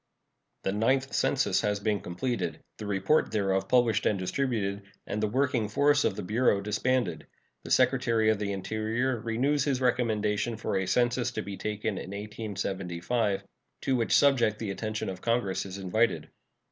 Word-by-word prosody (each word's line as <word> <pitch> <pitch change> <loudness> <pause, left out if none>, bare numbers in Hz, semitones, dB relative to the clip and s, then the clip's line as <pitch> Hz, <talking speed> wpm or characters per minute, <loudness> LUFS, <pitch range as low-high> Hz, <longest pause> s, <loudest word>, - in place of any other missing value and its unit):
The 95 - 0
Ninth 130 +6 +1
Census 135 -1 +2
has 105 -1 0
been 105 0 0
completed, 120 +9 -3 0.2
the 105 - -5
report 100 +10 +2
thereof 95 -2 0
published 120 -4 +3
and 105 - +2
distributed, 100 -1 -1 0.2
and 105 - -3
the 110 - +2
working 130 -1 +1
force 145 +5 +3
of - - +1
the - - -5
Bureau 105 +2 +2
disbanded. 105 -2 -1 0.4
The - - -8
Secretary 120 -4 +3
of 110 - -1
the 100 -1 -2
Interior 110 +5 -1
renews 130 +6 +1
his 135 -4 +1
recommendation 115 -3 0
for 110 - -2
a 95 -1 0
census 120 +1 +2
to - - -3
be 100 0 -6
taken 105 0 -3
in - - -7
1875, 100 0 -2 0.4
to 135 - +1
which 115 -3 +3
subject 120 -7 +3
the 110 -3 -3
attention 110 +2 -3
of 95 -1 -5
Congress 115 -5 0
is 95 +1 -7
invited. 100 +5 0
110 Hz, 160 wpm, -28 LUFS, 100-125 Hz, 0.4 s, published